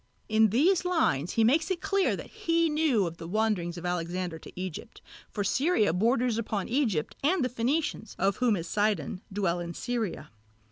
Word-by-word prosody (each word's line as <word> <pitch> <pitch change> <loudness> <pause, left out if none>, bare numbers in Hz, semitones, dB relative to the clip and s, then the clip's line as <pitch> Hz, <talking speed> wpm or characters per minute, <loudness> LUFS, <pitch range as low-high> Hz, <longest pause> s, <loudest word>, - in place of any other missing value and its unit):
In 220 0 +4
these 330 - +3
lines 315 - +1
he 225 - +3
makes 310 - +3
it 375 -2 -1
clear 395 +1 +1
that - - -9 0.2
he 335 0 +3
knew 300 -9 +2
of 165 -1 -5
the 165 - -8
wanderings 190 -4 0
of 175 - -7
Alexander 175 -1 -2
to - - -12
Egypt, 185 -3 -6 0.3
for 205 - -3
Syria 220 - +2
borders 230 +4 +1
upon 210 -3 -2
Egypt 230 - 0
and 305 -1 +2
the - - -1
Phenicians, 245 -1 -2
of 195 +2 +1
whom 245 -4 +2
is 170 -2 -4
Sidon, 205 -4 0
dwell 190 -3 0
in 170 -1 -5
Syria. 235 -6 -3
220 Hz, 180 wpm, -28 LUFS, 180-275 Hz, 0.3 s, In